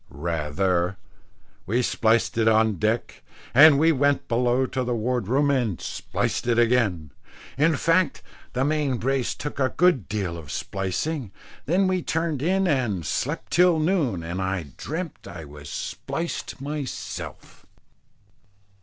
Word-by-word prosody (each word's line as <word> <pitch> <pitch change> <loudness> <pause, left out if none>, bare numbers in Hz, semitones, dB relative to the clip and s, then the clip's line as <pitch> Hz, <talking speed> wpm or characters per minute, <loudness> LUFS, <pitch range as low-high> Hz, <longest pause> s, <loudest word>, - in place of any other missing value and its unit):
Rather. 85 +4 -1 0.7
We 120 +6 +1
spliced 115 0 +2
it 115 -1 +2
on 110 -2 +3
deck, 110 +4 -1 0.3
and 145 +2 +8
we 160 +3 +4
went 145 -1 +1
below 125 +2 +2
to 130 0 -2
the 120 -1 -1
ward 120 -1 -1
room 140 +4 +2
and 120 - 0
spliced - - -3
it 120 -1 +2
again; 115 - +2 0.4
in 150 +3 +3
fact 165 +1 +1 0.3
that 125 - 0
main 145 -4 0
brace 130 +1 -1
took 145 -1 -6
a 130 -1 +2
good 175 - +3
deal 95 -5 -2
of 75 -4 -9
splicing, 100 - -3 0.4
then 185 +6 +3
we 185 -1 +1
turned 160 -1 -1
in 190 +4 +2
and 120 - 0
slept 150 - -3
till 180 -1 +5
noon, 155 - 0
and 85 +3 -4
I 95 -6 -3
dreamt 160 +3 -6
I 85 -2 -8
was 75 0 -11
spliced 165 - -4
myself. 145 -1 -6
125 Hz, 140 wpm, -24 LUFS, 95-150 Hz, 0.7 s, and